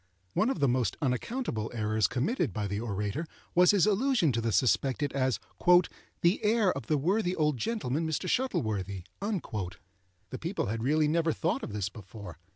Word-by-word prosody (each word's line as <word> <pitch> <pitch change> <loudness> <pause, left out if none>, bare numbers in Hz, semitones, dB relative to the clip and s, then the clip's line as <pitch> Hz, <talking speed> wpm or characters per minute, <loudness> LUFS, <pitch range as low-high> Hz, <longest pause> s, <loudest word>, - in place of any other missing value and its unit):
One 225 - +2
of 270 - -2
the 140 - +3
most 125 -2 0
unaccountable 130 - -2
errors 110 -2 +1
committed 150 - 0
by 105 +3 -3
the 100 +1 -2
orator 105 - -3 0.3
was 180 +1 +6
his 200 -4 +5
allusion 215 - +2
to 115 -1 -1
the 115 0 0
suspected 130 +6 +1
as 130 -3 +1 0.8
"the 175 +6 +2
heir 215 -2 +3
of 135 -5 -7
the 155 - +2
worthy 180 +5 +1
old 150 -5 +1
gentleman 160 - -1
Mr. 160 +4 -2
Shuttleworthy." 105 - -1 0.2
The 95 - -6
people 170 +5 -2
had 110 +3 -3
really 150 +5 +2
never 165 +1 +2
thought 135 - -1
of - - -6
this 100 -2 -2
before. 100 -4 -10
130 Hz, 165 wpm, -29 LUFS, 105-175 Hz, 0.8 s, was